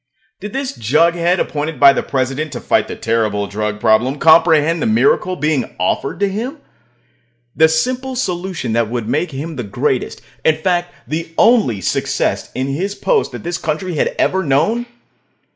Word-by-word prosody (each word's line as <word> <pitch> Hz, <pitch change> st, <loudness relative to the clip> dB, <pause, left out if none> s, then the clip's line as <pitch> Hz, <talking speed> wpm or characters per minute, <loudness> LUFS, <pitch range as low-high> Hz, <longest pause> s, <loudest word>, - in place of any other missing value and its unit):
Did 205 Hz, +2 st, -7 dB
this 270 Hz, -1 st, -2 dB
jughead 170 Hz, -, +2 dB
appointed 150 Hz, -1 st, -3 dB
by 140 Hz, -1 st, +8 dB
the -, -, -1 dB
President 135 Hz, +3 st, -2 dB
to 120 Hz, -, -5 dB
fight -, -, +1 dB
the -, -, -6 dB
terrible 110 Hz, -3 st, 0 dB
drug 105 Hz, +1 st, -3 dB
problem 120 Hz, +7 st, +2 dB
comprehend 160 Hz, +1 st, +4 dB
the 235 Hz, -, +1 dB
miracle 225 Hz, -, +2 dB
being 150 Hz, -6 st, -1 dB
offered 90 Hz, +9 st, -1 dB
to 200 Hz, -, +3 dB
him? 230 Hz, +10 st, -4 dB, 1.0 s
The 160 Hz, 0 st, +5 dB
simple 255 Hz, +11 st, -1 dB
solution 180 Hz, -, -3 dB
that 115 Hz, -1 st, +1 dB
would 120 Hz, -2 st, -3 dB
make 150 Hz, +9 st, 0 dB
him 150 Hz, +2 st, -6 dB
the 125 Hz, -, -3 dB
greatest 100 Hz, -2 st, -2 dB, 0.2 s
in 155 Hz, -1 st, +3 dB
fact, 175 Hz, +1 st, -1 dB, 0.2 s
the 165 Hz, +1 st, -4 dB
only 215 Hz, -, +3 dB
success -, -, -1 dB
in 130 Hz, -, -1 dB
his 180 Hz, +9 st, -3 dB
post 460 Hz, -, 0 dB
that -, -, -7 dB
this 175 Hz, 0 st, -3 dB
country 160 Hz, +4 st, -3 dB
had 150 Hz, -, -1 dB
ever 190 Hz, -, +1 dB
known? 210 Hz, -, +1 dB
160 Hz, 165 wpm, -17 LUFS, 130-185 Hz, 1.0 s, by